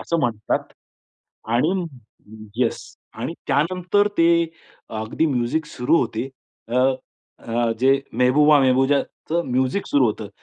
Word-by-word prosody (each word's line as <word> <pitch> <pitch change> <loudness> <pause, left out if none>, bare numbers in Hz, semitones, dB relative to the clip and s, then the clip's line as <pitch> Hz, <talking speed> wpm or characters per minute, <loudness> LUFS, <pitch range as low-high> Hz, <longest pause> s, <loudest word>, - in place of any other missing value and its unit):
असं 170 - -1
म्हणतात 110 -5 -1 0.9
आणि 150 +9 +2 0.8
येस, 120 -2 +1 0.4
आणि - - -4
त्यानंतर 180 +7 +2
ते 165 0 +5 0.7
अगदी 110 +9 -1
म्युझिक 135 +3 -1
सुरू 125 +2 +1
होते. 115 +2 -2 0.4
अ, 120 - -2 0.6
अ, 115 0 -1
जे 135 +1 +4
मेहबूबा-मेहबूबाच 135 +2 +3
म्युझिक 130 +9 0
सुरू 140 -3 +3
होतं. 105 -1 -3
130 Hz, 105 wpm, -22 LUFS, 120-150 Hz, 0.9 s, ते